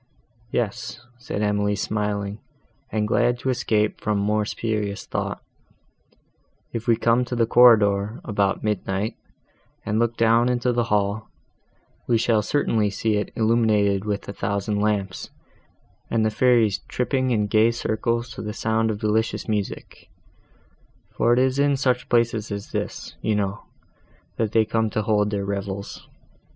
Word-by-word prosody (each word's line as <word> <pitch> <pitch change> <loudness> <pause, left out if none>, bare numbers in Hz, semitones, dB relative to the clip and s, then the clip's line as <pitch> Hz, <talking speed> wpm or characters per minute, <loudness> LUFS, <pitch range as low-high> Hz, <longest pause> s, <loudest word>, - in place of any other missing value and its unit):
"Yes," 120 +1 -3 0.2
said 105 -4 -3
Emily, 105 0 +1
smiling, 105 0 -2 0.5
and 105 0 0
glad 120 +2 +2
to 130 +2 -1
escape 105 -3 0
from 105 -1 0
more 105 +1 +1
serious 105 -2 -3
thought, - - -4 1.3
"if 115 +1 -4
we 115 - +5
come 115 +2 +2
to 125 - -4
the 115 -1 +3
corridor, 110 -3 +5
about 100 -3 0
midnight, 105 0 -1 0.7
and 105 +1 0
look 115 0 0
down 115 +2 +4
into 125 0 +1
the 120 -1 +1
hall, 105 0 0 0.8
we 120 - +3
shall 115 -1 +2
certainly 110 -3 +1
see 105 +2 -1
it 105 - -3
illuminated 110 -4 +2
with 105 -1 -3
a 100 - -5
thousand 100 +1 -2
lamps, 100 -3 -1 0.8
and 115 -1 +1
the 110 - +1
fairies 115 -4 +3
tripping 130 +1 0
in 110 -4 +1
gay 110 +2 +4
circles 115 +1 -1
to - - -7
the 105 0 -5
sound 110 0 0
of 110 - -2
delicious 110 +1 -1
music; 105 -3 -4 1.0
for 120 - +1
it 120 - +4
is 130 +1 +2
in 140 -1 +3
such 125 -2 0
places 115 -3 +1
as 100 0 -5
this, - - -4
you 110 0 0
know, 100 -1 -2 0.7
that 110 -2 0
they 110 -1 +3
come 110 0 0
to 110 +1 -2
hold 105 -1 +2
their 100 -2 -2
revels. 100 0 -5
110 Hz, 150 wpm, -23 LUFS, 105-115 Hz, 1.3 s, we